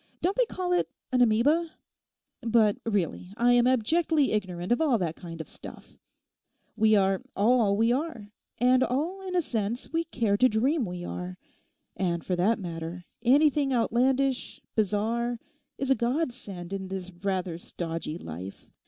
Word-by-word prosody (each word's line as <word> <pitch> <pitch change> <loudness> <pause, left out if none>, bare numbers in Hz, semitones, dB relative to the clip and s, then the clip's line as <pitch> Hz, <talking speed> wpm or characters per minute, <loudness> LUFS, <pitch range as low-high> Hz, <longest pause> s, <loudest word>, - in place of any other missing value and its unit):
Don't 375 +3 0
they - - +2
call 360 -3 -2
it 355 - +1 0.2
an 250 -1 +3
amoeba? 285 +9 +3 0.7
But 225 -3 +3
really 195 -2 -2
I 245 +1 +4
am 245 0 +5
abjectly 290 +4 +2
ignorant 185 -3 -2
of 240 - +3
all 285 -7 +3
that 170 -5 -2
kind 165 -2 -9
of 160 - -6
stuff. - - -12 0.8
We 220 -1 +4
are 195 -1 +2
all 215 -2 +3
we 225 +2 +3
are, 245 -7 -3 0.3
and 255 +1 +4
all 320 +10 -1
in 365 - -3
a 350 - +3
sense 230 +2 -3
we 330 0 +1
care 225 -10 0
to 255 +3 +5
dream 255 +5 +1
we 175 0 -6
are. 180 +1 -5 0.6
And 170 -3 -1
for 185 - 0
that 195 +6 +2
matter, 170 -1 -6 0.2
anything 280 +3 +4
outlandish, 255 +2 +1
bizarre, 225 +3 0 0.4
is 270 -1 -1
a - - +6
godsend 235 - -3
in 190 -1 -4
this 185 -1 -5
rather 185 -2 -3
stodgy 165 -2 -5
life. 90 - -9
225 Hz, 155 wpm, -28 LUFS, 185-260 Hz, 0.8 s, a